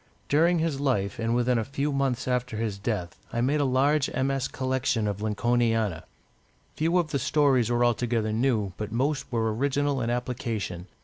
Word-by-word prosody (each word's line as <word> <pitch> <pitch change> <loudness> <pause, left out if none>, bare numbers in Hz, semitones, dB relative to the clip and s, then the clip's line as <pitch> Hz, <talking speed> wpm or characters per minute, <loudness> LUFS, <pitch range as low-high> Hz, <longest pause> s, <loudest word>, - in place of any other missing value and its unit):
During 170 +4 +4
his 160 -4 -1
life, 110 -9 0
and 115 +1 0
within 125 0 +2
a - - 0
few 140 +4 -2
months 135 -2 0
after 125 -3 -1
his 110 -3 -2
death, 100 -5 -3
I 120 - -2
made 145 +4 +2
a - - +2
large 135 +3 +2
MS. 135 0 0
collection 130 -4 -1
of 100 0 -3
Lincolniana. 115 -4 0 0.7
Few 165 +3 +1
of 165 -4 0
the 140 - 0
stories 130 -3 +2
were 120 0 +2
altogether 115 -2 0
new, 110 -5 +1
but 105 -1 -5
most 135 +5 -1
were 110 -2 0
original 140 +2 0
in 115 - -1
application. 115 -7 -3
125 Hz, 175 wpm, -27 LUFS, 110-140 Hz, 0.7 s, During